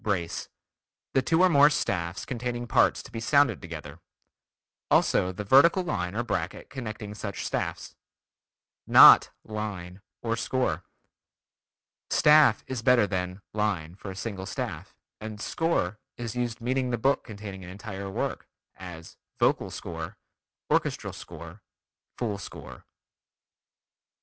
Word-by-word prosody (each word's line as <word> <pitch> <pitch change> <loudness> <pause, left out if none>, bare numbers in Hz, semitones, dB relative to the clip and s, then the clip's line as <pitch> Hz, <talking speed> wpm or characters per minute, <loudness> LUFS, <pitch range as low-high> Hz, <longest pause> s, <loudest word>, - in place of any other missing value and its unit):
Brace: 95 -6 -2 0.6
The 135 - +4
two 165 +7 +3
or - - +7
more 145 -2 +7
staffs 85 - -2
containing 120 -1 -3
parts - - +3
to - - -13
be 115 - -5
sounded 140 +5 +3
together; 80 -3 -8 0.9
also 90 - +3
the 95 +3 -6
vertical 140 - +5
line 90 - -3
or 120 - 0
bracket 95 -6 -4
connecting 110 -5 -6
such 105 -2 -5
staffs. - - -3 0.9
Not - - +9
"line" 100 -4 -6 0.2
or 115 -1 0
"score." 115 -9 -1 1.3
"Staff" 150 -1 +5
is 130 -3 -4
better 120 -2 +5
than 90 0 -4
"line" 100 -7 -1
for 95 +1 -9
a 95 - -7
single 95 -2 -5
staff, - - -5 0.2
and 110 -1 -7
"score" 110 - -1 0.2
is 120 -2 -5
used 120 -1 -2
meaning 130 +2 0
the 120 - 0
book 135 +4 +1
containing 100 -4 -8
an 90 - -9
entire 100 0 -7
work, 95 - -3 0.3
as 85 -2 -10 0.2
"vocal - - +2
score," - - -7 0.6
"orchestral - - 0
score," 85 +4 -10 0.6
"full 105 -5 -2
score." 95 - -10
105 Hz, 130 wpm, -27 LUFS, 95-125 Hz, 1.3 s, Not